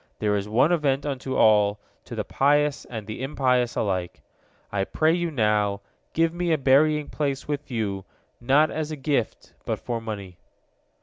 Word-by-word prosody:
There 105 -1 +1
is 100 +1 -3
one 125 +9 +3
event 145 -5 +1
unto 135 -2 -3
all, 105 -1 +4 0.3
to - - -8
the - - -2
pious 145 +1 +1
and 110 -4 -7
the 110 +3 -6
impious 125 -3 +1
alike. 90 -4 -2 0.5
I 100 -1 0
pray 155 +10 +1
you 175 -1 0
now, 105 -6 +1 0.3
give 165 0 +2
me 175 0 -1
a 160 - +3
burying 150 +2 +3
place 140 -2 -3
with 145 0 -4
you, 105 -6 -2 0.4
not 140 +6 +3
as 155 -1 -3
a 155 - -4
gift, 135 -5 -2
but - - -2
for 115 -1 -4
money." 100 -5 -7
130 Hz, 170 wpm, -25 LUFS, 105-150 Hz, 0.5 s, all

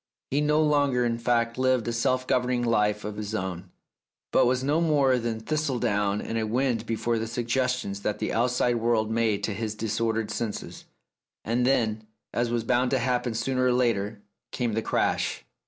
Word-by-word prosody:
He 140 +2 +2
no 150 +1 +3
longer, 145 -5 +2
in 115 -1 -1
fact, 115 0 0
lived 130 -3 +2
a 120 - -1
self 130 +2 +1
governing 125 -1 +1
life 105 -3 +1
of 105 0 -5
his 105 +1 -4
own, 95 -2 -4 0.6
but - - +4
was 125 +1 +1
no 150 +4 +2
more 140 -6 +3
than 115 -1 -2
thistledown 110 -7 0
in 115 - -3
a 110 -1 -1
wind 120 -1 0
before 115 +1 0
the 115 - -3
sug 115 +1 -3
gestions 125 -5 -1
that 105 0 -1
the - - -2
outside 120 0 +1
world 115 -1 +1
made 110 -3 +1
to 105 - -1
his 110 +1 -3
dis 110 +1 -2
ordered 110 -1 0
senses. 110 -2 -5 0.6
And 120 +3 +1
then, 110 -5 +1 0.3
as 120 0 0
was 120 -1 -1
bound 125 +2 +2
to 135 - +2
happen 125 -1 0
sooner 130 +2 0
or 125 - +3
later, 110 -4 0 0.3
came 120 -4 -1
the 110 - 0
crash. 65 -10 -1
115 Hz, 190 wpm, -26 LUFS, 110-125 Hz, 0.6 s, but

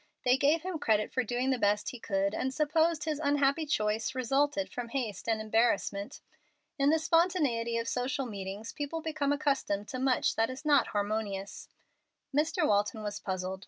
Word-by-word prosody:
They 250 0 +5
gave 295 +4 +2
him 365 -3 -3
credit 215 -5 +1
for 255 - +1
doing 245 +3 -1
the 255 - 0
best 205 0 +1
he 250 - -9
could, 200 -2 0
and 260 - -1
supposed 315 +2 +1
his 310 -2 -2
unhappy 285 +2 +2
choice 215 -3 0
resulted 285 +3 +1
from 245 -1 -6
haste 230 -5 -3
and 220 -1 +1
embarrassment. 215 -2 0 0.6
In 275 +1 +4
the 320 - +4
spontaneity 310 -9 +1
of 230 0 -2
social 255 +3 -1
meetings 200 0 -6
people 295 +3 -4
become 300 -3 -1
accustomed 275 -9 0
to 255 - -4
much 260 -1 +2
that 225 0 +2
is 260 +4 -8
not 290 -3 +4
harmonious. 205 -1 -3 0.7
Mr. 315 +3 +2
Walton 210 +2 +1
was 205 -1 -4
puzzled. 185 0 -3
255 Hz, 170 wpm, -30 LUFS, 210-290 Hz, 0.7 s, They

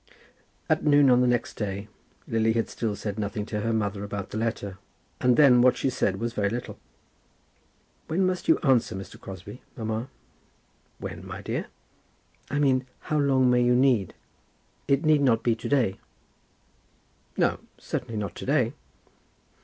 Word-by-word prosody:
At - - +1
noon 145 -3 +5
on 125 0 +5
the 125 - +3
next 120 -1 0
day 100 -1 -4 0.4
Lily 110 0 +2
had 115 0 -1
still 110 -3 -2
said 105 +1 -5
nothing 105 0 -3
to 105 -1 -3
her 115 - 0
mother 100 -2 -1
about 100 -1 -5
the - - -4
letter; 100 -4 -3 0.4
and 125 -1 +3
then 130 -5 +7
what 125 0 +4
she 135 - 0
said 95 -5 0
was 115 +1 -2
very 100 -3 0
little. 120 +3 -5 1.3
"When 180 +4 +1
must 185 -1 -1
you 325 - +5
answer 130 - +3
Mr. 95 0 -9
Crosbie, 95 +5 -9 0.2
mamma?" 110 +2 -3 0.9
"When, - - -7
my - - -8
dear?" - - -3 0.8
"I 145 - -2
mean 130 -3 +2 0.3
how 150 - +3
long 130 -3 +3
may 125 0 +4
you 125 0 +4
take? 125 -9 +2 0.7
It 140 +3 +2
need 155 -2 +4
not 120 -5 +3
be 120 - +3
to 115 - -6
day." 120 -9 +1 1.4
"No; - - +2 0.2
certainly 115 - -4
not 100 -4 -3
to - - -6
day." 130 -4 +2
115 Hz, 160 wpm, -26 LUFS, 105-130 Hz, 1.4 s, then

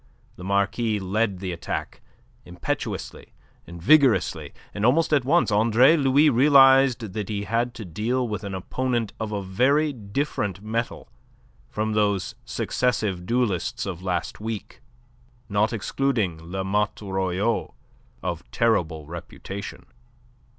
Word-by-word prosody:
The 90 - -11
Marquis 100 +3 0
led 100 +1 0
the 95 0 -4
attack, 85 -1 -5 0.4
impetuously 90 -1 -5 0.3
and 85 0 -9
vigorously, 120 - +3 0.2
and 100 - -4
almost 150 +7 +3
at 140 -4 +3
once 165 -3 +3
Andre 115 +8 +5
Louis 140 0 +4
realized 135 -4 +5
that 105 -2 -4
he 100 -1 -2
had 115 +4 -1
to 110 - -7
deal 115 +9 -1
with 105 -1 -4
an 100 -1 -4
opponent 120 +3 -2
of 110 -1 -3
a 100 -2 -3
very 140 +11 +2
different 105 - -3
mettle 115 +2 -3 0.6
from 110 0 -2
those 100 -3 +1
successive 105 -8 -1
duellists 115 -8 0
of 90 -3 -5
last 90 -2 -3
week, 110 -1 -6 0.7
not 105 +2 +1
excluding 110 -5 -1
La 95 0 -2
Motte 105 +2 -1
Royau, 95 +3 -1 0.5
of 90 -1 -4
terrible 80 -10 0
reputation. 85 +4 -8
105 Hz, 125 wpm, -24 LUFS, 95-125 Hz, 0.7 s, Andre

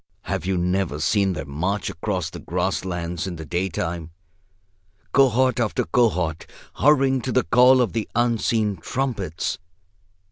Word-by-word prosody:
Have - - -3
you 95 -1 +1
never 90 -3 0
seen 95 +3 +2
them 70 -5 -6
march 95 +7 -1
across 90 -1 -3
the - - -8
grass - - -2
lands 85 -1 -3
in 90 - -5
the 80 -1 -8
daytime, 85 -1 -3 1.0
cohort 130 -2 +3
after 110 -3 0
cohort, 90 -10 0 0.3
hurrying 135 -2 +3
to 130 - -3
the - - +2
call 125 +8 +5
of 115 -6 0
the 110 -1 -2
unseen 115 -3 +1
trumpets? 100 - -3
95 Hz, 140 wpm, -23 LUFS, 85-120 Hz, 1.0 s, call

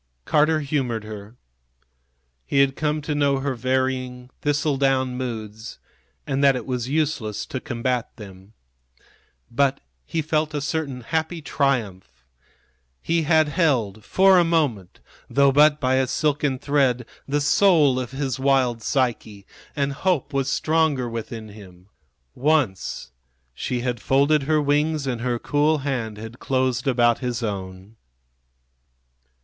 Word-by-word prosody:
Carter 155 +1 +3
humored 135 -6 -2
her. 105 +1 -9 1.1
He - - -1
had 135 -1 +2
come 150 -1 -1
to 150 - -2
know 140 -2 +2
her 135 0 -2
varying, 130 0 -2
thistle 145 0 0
down 130 -2 +1
moods, 110 -3 -6 0.5
and 140 0 -1
that 135 -1 +5
it 125 - -4
was 125 -2 -3
useless 135 -9 -1
to 130 - -5
combat 125 -2 -2
them. 95 -1 -13 1.0
But 135 +3 +1 0.2
he 160 - -3
felt 155 0 -1
a - - 0
certain 140 -3 -3
happy 160 +6 -2
triumph. 105 - -2 0.7
He 165 - 0
had 160 -2 +4
held 125 - 0
for 190 - +5
a - - +5
moment, 145 - -1 0.3
though 140 0 +4
but 150 +2 +5
by 130 0 +1
a 130 -1 +1
silken 145 -1 0
thread, 130 -3 +1 0.2
the 145 +1 0
soul 145 -3 +4
of 125 -2 -4
his 135 -1 -3
wild 130 -4 +2
Psyche, 110 -6 -2 0.3
and 140 -1 -1
hope 170 -1 -1
was 135 0 0
stronger 155 -4 +1
within 115 -1 -6
him. 95 -3 -15 0.4
Once 130 - 0 0.4
she 120 - -3
had 120 -2 -2
folded 140 +3 +3
her 155 +1 +2
wings 150 +1 +1
and 125 -3 -3
her 120 -1 -1
cool 150 +5 +1
hand 115 -6 -2
had 110 +3 -9
closed 130 -1 0
about 120 -3 +3
his 125 -2 -3
own. 95 0 -6
130 Hz, 135 wpm, -23 LUFS, 115-145 Hz, 1.1 s, that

